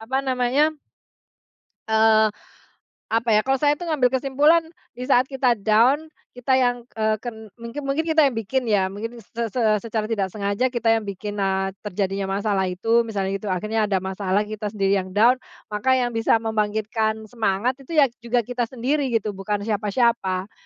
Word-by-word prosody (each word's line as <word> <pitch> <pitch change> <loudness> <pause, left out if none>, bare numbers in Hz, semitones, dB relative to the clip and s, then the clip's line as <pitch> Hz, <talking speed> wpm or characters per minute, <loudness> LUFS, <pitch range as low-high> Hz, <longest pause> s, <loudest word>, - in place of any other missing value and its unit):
apa 250 +4 -2
namanya 260 +4 +2 1.2
eee, 220 0 +4 0.8
apa 230 +1 0
ya 210 - +5
kalau 270 +5 +1
saya 290 +2 +2
itu 350 - -6
ngambil 265 -6 +2
kesimpulan 280 +5 +3 0.3
di 250 +1 -7
saat 255 -2 +5
kita 260 -3 +2
down 235 +9 +2 0.2
kita 250 +2 0
yang, 245 -1 +1 0.2
eee, 215 0 +2
ke 240 - -2 0.3
mungkin 235 +4 -7
mungkin 280 +4 0
kita 320 -2 +4
yang 255 - -3
bikin 240 +3 -2
ya 195 -3 +2
mungkin 225 +4 -6
se 230 +2 -4
se 245 +3 -3 0.2
secara 220 0 -3
tidak 200 -3 0
sengaja 200 +5 -1
kita 235 -3 0
yang 225 -2 0
bikin, 205 +1 -5
eee, 195 0 0
terjadinya 195 -1 -2
masalah 200 -2 0
itu 225 +6 +1
misalnya 195 -3 -2
gitu 210 - -7
akhirnya 215 +4 0
ada 190 -2 0
masalah 190 +1 -1
kita 210 0 -5
sendiri 200 -1 +1
yang 185 0 -7
down, 240 +5 +5 0.3
maka 260 +5 +2
yang 245 -1 0
bisa 225 0 +2
membangkitkan 220 0 -1
semangat 230 +3 -1
itu 275 +5 -7
ya 275 -5 +5
juga 235 +1 0
kita 245 +1 -2
sendiri 265 +4 -1
gitu, 225 -4 -1
bukan 205 +1 -3
siapa-siapa. 210 -2 0
225 Hz, 170 wpm, -23 LUFS, 205-250 Hz, 1.2 s, ya